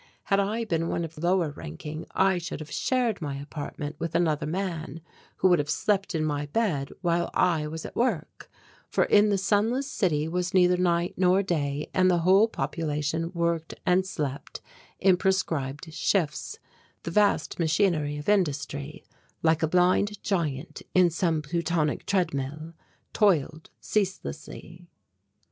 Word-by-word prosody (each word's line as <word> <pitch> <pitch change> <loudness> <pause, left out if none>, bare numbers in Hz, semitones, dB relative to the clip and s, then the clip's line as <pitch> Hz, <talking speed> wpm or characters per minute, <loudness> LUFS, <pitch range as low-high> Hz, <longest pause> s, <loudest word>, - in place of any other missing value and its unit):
Had 195 - +2
I 215 +4 0
been 165 -5 -1
one 170 - -1
of 165 0 -10
lower 175 -1 +1
ranking 150 - -7
I 190 -1 +3
should 170 - -6
have 155 0 -9
shared 240 0 0
my 145 -3 -3
apartment 145 +1 -6
with 165 0 -4
another 155 -3 +1
man 165 -3 -4 0.4
who - - +3
would 175 -3 +4
have 145 0 -2
slept 195 +2 0
in 155 -1 0
my 145 -1 -2
bed 150 -7 0
while 170 -1 +1
I 160 -4 +2
was 160 +1 -6
at - - -8
work, 230 -10 -2 0.4
for - - +2
in 210 0 +4
the 200 - +2
sunless 220 +7 +1
city 160 - 0
was 180 +2 -2
neither 180 -1 +5
night 175 -1 +1
nor 185 +1 +3
day 150 -5 -2
and 185 0 +4
the 175 - +3
whole 195 +4 +6
population 160 -3 -2
worked 170 -1 -1
and 185 0 +3
slept 145 -7 -5 0.4
in 185 -1 +4
prescribed 160 -5 -1
shifts 160 -4 -1 0.5
the 170 - -4
vast 205 0 +2
machinery 160 -3 +1
of 145 - -8
industry, 150 -6 -1 0.4
like 160 -1 +3
a 160 - +2
blind 180 +4 +2
giant 155 -9 -2
in 180 -2 +5
some 165 -2 0
Plutonic 165 -1 -1
treadmill, 155 -4 -1 0.4
toiled 160 -6 +1
ceaselessly. 175 - -4
170 Hz, 150 wpm, -27 LUFS, 150-190 Hz, 0.5 s, whole